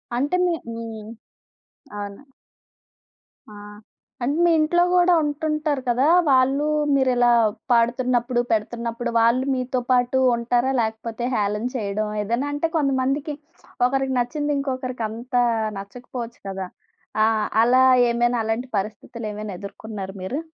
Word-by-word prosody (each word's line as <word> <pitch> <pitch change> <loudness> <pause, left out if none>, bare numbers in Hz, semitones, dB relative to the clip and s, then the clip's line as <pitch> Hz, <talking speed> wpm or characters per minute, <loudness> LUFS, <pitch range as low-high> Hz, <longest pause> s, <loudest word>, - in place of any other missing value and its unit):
అంటే 280 +8 0
మీ 350 - +1 0.2
మీ 230 0 -6 1.1
అవును. 205 +4 -7 1.3
ఆ! - - -12 0.7
అంటే 280 +5 0
మీ 345 - +4
ఇంట్లో 345 +3 +3
గూడా 360 0 +5
ఉంటుంటారు 300 -1 -1
కదా! 250 +4 +2 0.2
వాళ్ళు 270 +2 +3 0.3
మీరిలా 250 -3 +3 0.4
పాడుతున్నప్పుడు, 240 +1 +2
పెడుతున్నప్పుడు 235 +2 -2
వాళ్ళు 235 +3 +3
మీతో 255 0 -1
పాటు 250 +1 +3 0.2
ఉంటారా 240 +2 +1
లేకపోతే 225 +1 -3
హేళన 210 +1 -1
చేయడం. 210 -2 -2
ఏదైనా 235 +7 -1
అంటే 295 +3 -1
కొంతమందికి 275 +1 0 0.5
ఒకరికి 270 0 -1
నచ్చింది 290 +4 -1
ఇంకొకరికి 255 -3 -3
అంతా 245 +3 -1 0.4
నచ్చకపోవచ్చు 235 +3 -8
కదా! 190 -1 -4 0.6
ఆహ్, 220 -1 +1 0.2
అలా 255 +2 +5 0.3
ఏమైనా 240 0 +1
అలాంటి 225 +3 -2
పరిస్థితులు 215 +3 -7
ఏమైనా 210 0 -6
ఎదుర్కొన్నార 200 -1 -7
మీరు? 250 +10 -3
245 Hz, 115 wpm, -23 LUFS, 225-270 Hz, 1.3 s, గూడా